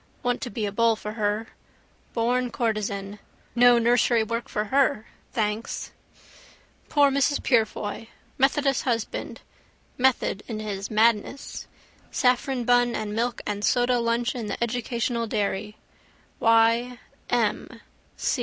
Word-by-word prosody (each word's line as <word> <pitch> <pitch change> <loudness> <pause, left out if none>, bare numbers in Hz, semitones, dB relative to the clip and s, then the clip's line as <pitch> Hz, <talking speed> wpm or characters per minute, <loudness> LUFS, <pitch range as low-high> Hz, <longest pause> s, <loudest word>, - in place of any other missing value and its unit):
Want 245 0 0
to 245 - -4
be 215 0 -3
a 200 - -2
bull 230 +2 +3
for 210 -1 -6
her. 215 0 -1 0.7
Born 245 +2 +1
courtesan. 210 -3 -2 0.3
No 245 0 +6
nursery 235 0 +3
work 230 +2 -4
for 210 - -1
her, 275 -5 +3 0.3
thanks. 215 0 -2 1.0
Poor 285 -2 +4
Mrs 280 +1 +1
Purefoy! 220 -2 0 0.3
Methodist 275 0 +2
husband. 230 -4 -3 0.6
Method 250 -5 +2
in 220 -3 -4
his 200 -2 -4
madness. 225 +4 0 0.4
Saffron 250 0 +1
bun 245 -1 +3
and 215 -1 -3
milk 235 +2 -1
and 205 0 -3
soda 245 +1 +2
lunch 235 0 0
in 235 -4 -5
the - - -3
educational 235 0 -2
dairy. 210 0 -2 0.6
Y. 230 +2 +3 0.3
M. - - +1
230 Hz, 120 wpm, -25 LUFS, 215-245 Hz, 1.0 s, No